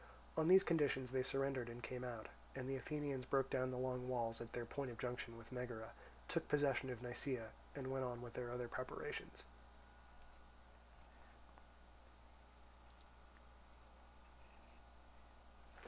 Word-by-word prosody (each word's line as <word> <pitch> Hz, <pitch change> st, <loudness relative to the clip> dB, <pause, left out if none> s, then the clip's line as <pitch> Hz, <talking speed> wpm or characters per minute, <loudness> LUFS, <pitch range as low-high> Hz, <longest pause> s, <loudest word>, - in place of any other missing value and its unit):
On 160 Hz, -, +4 dB
these 190 Hz, +2 st, +10 dB
conditions 140 Hz, -6 st, +3 dB
they 130 Hz, 0 st, +3 dB
surrendered 135 Hz, -2 st, +1 dB
and 120 Hz, 0 st, -7 dB
came 125 Hz, +1 st, -3 dB
out, 120 Hz, -3 st, -3 dB, 0.3 s
and 130 Hz, -1 st, -2 dB
the 135 Hz, -, +1 dB
Athenians 140 Hz, -1 st, -1 dB
broke 135 Hz, +1 st, +2 dB
down 130 Hz, -1 st, +3 dB
the 130 Hz, -, -2 dB
long 125 Hz, 0 st, 0 dB
walls 115 Hz, -2 st, +1 dB
at 115 Hz, -, -5 dB
their 120 Hz, -1 st, -1 dB
point 140 Hz, +3 st, -2 dB
of 120 Hz, -, -6 dB
junction 120 Hz, -1 st, -2 dB
with 115 Hz, +1 st, -11 dB
Megara, 125 Hz, -3 st, -3 dB, 0.4 s
took -, -, 0 dB
possession 140 Hz, -3 st, +3 dB
of 125 Hz, -1 st, -4 dB
Nisaea, 120 Hz, -2 st, -1 dB, 0.2 s
and 140 Hz, -2 st, -3 dB
went 135 Hz, 0 st, +1 dB
on 120 Hz, -1 st, -2 dB
with 120 Hz, -1 st, -7 dB
their 120 Hz, -1 st, -2 dB
other 120 Hz, 0 st, -2 dB
preparations. 130 Hz, +2 st, -4 dB
125 Hz, 130 wpm, -43 LUFS, 120-135 Hz, 0.4 s, these